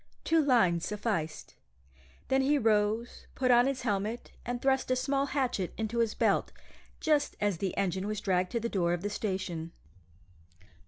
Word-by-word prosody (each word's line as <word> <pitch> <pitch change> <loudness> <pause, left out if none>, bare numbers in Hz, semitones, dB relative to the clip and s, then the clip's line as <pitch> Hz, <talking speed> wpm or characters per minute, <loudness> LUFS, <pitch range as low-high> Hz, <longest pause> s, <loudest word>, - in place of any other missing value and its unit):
Two 325 0 +3
lines 185 - +3
sufficed. 205 -7 -3 0.8
Then 265 0 +3
he 290 +2 +3
rose, 220 0 0
put 255 -1 +2
on 245 +1 +6
his 270 -2 -2
helmet, 215 +1 -2
and 245 0 -3
thrust 265 0 +1
a 255 - +3
small 275 +2 0
hatchet 255 -10 -1
into 220 +1 -2
his 230 -2 +1
belt, - - +1 0.5
just 300 -2 +1
as 205 -4 0
the 195 -2 -2
engine 190 +1 -1
was 215 -1 -2
dragged 185 -2 +1
to 235 - +1
the 230 - -2
door 175 -6 0
of 175 +1 -3
the 205 - -2
station. 185 -6 -3
220 Hz, 165 wpm, -30 LUFS, 190-255 Hz, 0.8 s, on